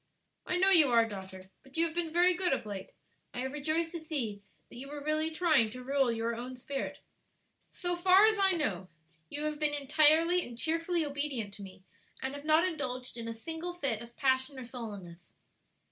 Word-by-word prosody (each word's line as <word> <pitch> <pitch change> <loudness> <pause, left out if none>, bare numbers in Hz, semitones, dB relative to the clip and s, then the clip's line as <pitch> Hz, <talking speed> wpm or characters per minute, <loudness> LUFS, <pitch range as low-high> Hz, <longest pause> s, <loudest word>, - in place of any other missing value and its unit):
"I 365 - +1
know 380 +2 +4
you 325 -6 +8
are, 230 -1 +4
daughter; 190 -2 -9
but 270 +3 -13
you 330 - +4
have 325 - -4
been 335 -1 -2
very 355 +2 +5
good 360 -2 +1
of 265 - -2
late. 200 -2 -7 0.4
I 245 - -1
have 265 +1 -3
rejoiced 310 +3 -1
to 340 - -5
see 255 -11 -4 0.3
that - - -12
you 265 +3 -8
were 290 0 -7
really 310 +1 0
trying 315 -8 +3
to 250 +3 -9
rule 270 -1 +2
your 230 0 -2
own 250 +2 -6
spirit. 270 +2 -5 0.7
So 355 0 -2
far 370 +3 +6
as 435 -1 +3
I 385 -1 +4
know, 195 - -2 0.4
you 295 - -5
have 305 -1 -2
been 300 -1 +1
entirely 310 +5 +4
and 240 -1 -10
cheerfully 330 +3 0
obedient 280 -8 -3
to 205 - -10
me, 190 -1 -11 0.4
and 265 +1 -4
have 285 +1 -8
not 315 +3 +4
indulged 255 -7 -4
in 230 -1 -6
a 230 - -3
single 325 +8 -5
fit 270 -10 -1
of 235 0 -12
passion 260 0 +1
or 260 - -7
sullenness." 200 -8 -9
285 Hz, 205 wpm, -31 LUFS, 235-330 Hz, 0.7 s, you